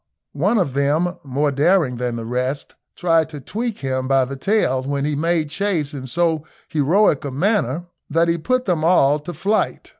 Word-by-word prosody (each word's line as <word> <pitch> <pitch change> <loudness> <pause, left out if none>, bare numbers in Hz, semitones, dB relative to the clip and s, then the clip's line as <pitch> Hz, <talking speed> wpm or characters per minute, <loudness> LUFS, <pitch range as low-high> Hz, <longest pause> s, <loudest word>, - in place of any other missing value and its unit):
One 195 +11 +1
of 175 -10 0
them, 155 +6 +1
more 140 +2 0
daring 145 -2 +2
than 120 -1 -2
the 115 -1 -5
rest, 125 +4 -3 0.2
tried 165 -3 +2
to 150 -2 -8
tweak 225 - -4
him 130 -1 -2
by 135 -1 +3
the 135 +2 -6
tail, 135 -4 +1
when 140 +1 -2
he 150 0 -1
made 160 0 0
chase 165 -5 -1
in 130 -2 -6
so 160 +1 0 0.3
heroic 160 +2 +2
a 140 - -3
manner 170 - 0 0.2
that 165 +3 +2
he 170 0 +1
put 255 +8 0
them 170 -5 0
all 150 -4 +4
to 150 +4 -7
flight. 195 +7 -1
150 Hz, 185 wpm, -21 LUFS, 135-175 Hz, 0.3 s, all